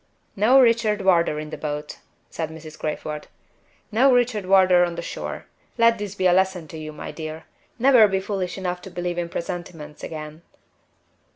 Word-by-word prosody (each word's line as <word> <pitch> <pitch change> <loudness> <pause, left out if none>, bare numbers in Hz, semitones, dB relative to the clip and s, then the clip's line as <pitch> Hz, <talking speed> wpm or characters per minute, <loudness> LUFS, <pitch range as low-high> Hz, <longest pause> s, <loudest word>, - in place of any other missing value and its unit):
"No 230 +7 +5
Richard 230 -4 +3
Wardour 170 -5 +3
in 155 0 -6
the - - -6
boat," 150 0 -5 0.3
said 160 -1 -3
Mrs. 160 -1 -10
Crayford. 150 0 -4 0.6
"No 255 +5 +4
Richard 240 -6 +1
Wardour 185 -2 +5
on 175 -1 -1
the 170 - -5
shore. - - -6 0.3
Let 230 -1 +4
this 205 -1 -5
be 185 - -1
a 180 - +5
lesson 190 -3 +1
to 160 - -8
you, 155 0 -6
my 150 - -7
dear. 160 0 -7 0.3
Never 250 -3 +6
be 195 -1 0
foolish 190 -2 -3
enough 180 -1 -3
to 190 - -9
believe 175 -1 -3
in 170 -1 -3
presentiments 165 -3 -6
again." 155 0 -7
180 Hz, 175 wpm, -23 LUFS, 160-205 Hz, 0.6 s, Never